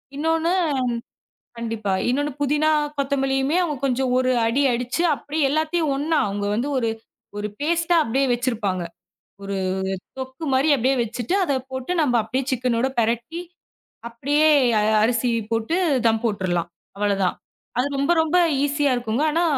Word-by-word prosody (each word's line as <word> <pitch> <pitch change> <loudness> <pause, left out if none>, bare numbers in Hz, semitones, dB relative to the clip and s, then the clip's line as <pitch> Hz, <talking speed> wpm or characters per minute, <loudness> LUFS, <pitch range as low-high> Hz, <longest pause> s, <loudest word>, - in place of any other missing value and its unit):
இன்னொன்னு 325 +3 +1 1.1
கண்டிப்பா. 225 -4 -3 0.2
இன்னொன்னு 285 +3 0
புதினா, 295 +2 +2 0.3
கொத்தமல்லியுமே 270 +2 0
அவுங்க 310 -4 -2
கொஞ்சம் 260 -1 0
ஒரு 255 0 +1 0.2
அடி 255 +5 +1
அடிச்சு, 245 +6 -1
அப்படியே 295 +2 -2
எல்லாத்தையும் 310 0 0
ஒன்னா, 310 +3 +1
அவுங்க 200 0 -3
வந்து 240 +6 -1
ஒரு 230 -2 0 0.5
ஒரு 210 - -3
பேஸ்டா 340 +2 +1
அப்டியே 265 +4 +1
வச்சிருப்பாங்க, 225 -7 -1 0.6
ஒரு 195 0 -3 0.6
தொக்கு 260 +4 -6
மாரி 270 +4 +3
அப்டியே 265 +3 +2
வச்சிட்டு, 235 - -3
அத 285 -6 0 0.2
போட்டு 260 +6 -3
நம்ப 265 -5 +2
அப்டியே 255 +4 -2
சிக்கனோட 250 0 0
பெரட்டி, 235 +9 -2 0.7
அப்டியே 290 +6 +2 0.3
அ - - +2 0.2
அரிசி 235 +1 +1 0.2
போட்டு 225 +9 0 0.3
தம் 225 0 +1
போட்டுறலாம், 185 -6 -1 0.3
அவ்வளதான். 200 -2 0 0.4
அது 255 - +2
ரொம்ப 280 +4 +1
ரொம்ப 320 +2 +1 0.3
ஈசியா 290 -1 +1
இருக்குங்க. 240 +3 -1
ஆனா, 335 +3 +1
260 Hz, 135 wpm, -22 LUFS, 230-295 Hz, 1.1 s, மாரி